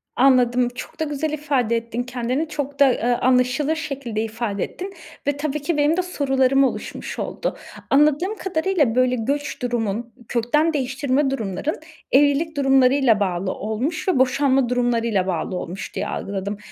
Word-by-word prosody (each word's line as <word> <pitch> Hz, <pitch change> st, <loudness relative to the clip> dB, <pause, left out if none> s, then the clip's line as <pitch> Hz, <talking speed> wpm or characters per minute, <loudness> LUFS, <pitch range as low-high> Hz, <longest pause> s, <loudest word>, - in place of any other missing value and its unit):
Anladım. 250 Hz, -1 st, +4 dB
Çok 260 Hz, -, -9 dB
da -, -, +1 dB
güzel 295 Hz, +1 st, -2 dB
ifade 280 Hz, -6 st, 0 dB
ettin 230 Hz, +1 st, -3 dB
kendini. 250 Hz, +5 st, -2 dB
Çok 285 Hz, -2 st, -4 dB
da, 270 Hz, -3 st, +6 dB
eee, -, -, -5 dB, 0.2 s
anlaşılır 255 Hz, +4 st, +2 dB
şekilde 270 Hz, -8 st, -3 dB
ifade 220 Hz, -3 st, -3 dB
ettin 385 Hz, +2 st, -6 dB, 0.3 s
ve 285 Hz, 0 st, +1 dB
tabii 300 Hz, 0 st, -2 dB
ki 300 Hz, +1 st, -1 dB
benim 295 Hz, +3 st, +3 dB
de -, -, +3 dB
sorularım 270 Hz, -6 st, +2 dB
oluşmuş 265 Hz, -, -3 dB
oldu. -, -, -3 dB, 0.3 s
Anladığım 300 Hz, +8 st, +3 dB
kadarıyla, 320 Hz, -8 st, 0 dB
böyle, 255 Hz, 0 st, +3 dB
göç 280 Hz, +6 st, -2 dB
durumun, 235 Hz, -1 st, -2 dB
kökten 300 Hz, +8 st, +1 dB
değiştirme 270 Hz, 0 st, 0 dB
durumların, 230 Hz, -, -2 dB, 0.4 s
evlilik 290 Hz, +3 st, +3 dB
durumlarıyla 270 Hz, -3 st, +4 dB
bağlı 185 Hz, -1 st, -1 dB
olmuş 240 Hz, -, -3 dB
ve 365 Hz, -9 st, +2 dB
boşanma 260 Hz, 0 st, +3 dB
durumlarıyla 235 Hz, -6 st, +1 dB
bağlı 185 Hz, +1 st, -2 dB
olmuş, 180 Hz, +1 st, -6 dB
diye -, -, -2 dB
algıladım 200 Hz, +1 st, -4 dB
265 Hz, 145 wpm, -22 LUFS, 235-290 Hz, 0.4 s, da